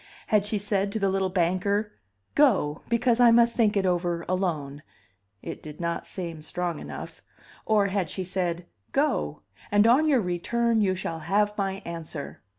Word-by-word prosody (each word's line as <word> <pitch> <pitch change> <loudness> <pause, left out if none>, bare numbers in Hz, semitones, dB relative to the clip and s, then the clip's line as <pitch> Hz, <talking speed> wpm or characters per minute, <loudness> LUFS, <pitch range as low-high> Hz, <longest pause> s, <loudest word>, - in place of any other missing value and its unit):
Had 210 -2 +2
she 210 +1 -1
said 200 -1 0
to 220 - -2
the 195 -1 +1
little 190 0 0
banker, 190 +4 0 0.4
Go, 195 - +3
because 235 0 +2
I 245 -1 +7
must 235 0 +5
think 215 -3 +3
it 195 - +1
over 175 -2 0
alone? 155 -7 -2 0.6
It - - -6
did 150 -1 -10
not 170 -1 -3
seem 170 -4 -5
strong 175 +1 -3
enough. - - -8 0.5
Or 215 -2 +4
had 190 -4 -1
she 190 - -3
said, 180 -2 -2 0.3
Go, 75 +3 0 0.3
and 205 +1 +4
on 260 +7 +5
your 280 -4 +4
return 225 +6 0
you 190 -2 +2
shall 165 -3 -4
have 205 +5 +1
my 195 -1 -2
answer? 165 -3 -7
190 Hz, 165 wpm, -26 LUFS, 170-210 Hz, 0.6 s, I